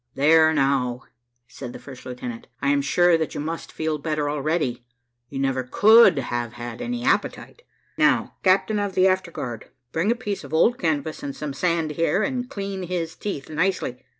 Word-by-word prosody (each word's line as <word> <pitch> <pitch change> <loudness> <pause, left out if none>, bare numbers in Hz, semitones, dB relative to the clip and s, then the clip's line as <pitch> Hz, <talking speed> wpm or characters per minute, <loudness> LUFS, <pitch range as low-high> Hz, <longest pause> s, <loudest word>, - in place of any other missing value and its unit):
"There 160 +3 +5
now," 135 -4 +1 0.4
said 125 -2 -8
the - - -7
first 130 -3 -11
lieutenant, 125 -2 -7
"I 140 - 0
am 140 0 +3
sure 175 +4 +3
that 160 - -3
you - - -3
must 160 +3 -5
feel 155 -1 -2
better 150 -1 -1
already; 145 -4 -1 0.5
you 140 - -7
never 135 -1 0
could 215 - +6
have 120 -3 -3
had 120 -1 -7
any 245 0 -3
appetite. 275 - -1 0.4
Now, - - +3
captain 200 +3 +3
of 200 -2 -2
the 185 +1 +5
afterguard, 170 - -2 0.2
bring 170 +6 0
a - - +1
piece 205 -4 -4
of - - -5
old 235 +9 +3
canvas 155 -2 -1
and 140 -1 -5
some 150 -2 -5
sand 165 0 0
here, 165 +6 +1
and 250 +2 -2
clean 195 -5 -5
his 175 -2 -3
teeth 190 -10 -5
nicely." 160 -6 -1
160 Hz, 180 wpm, -23 LUFS, 135-185 Hz, 0.5 s, could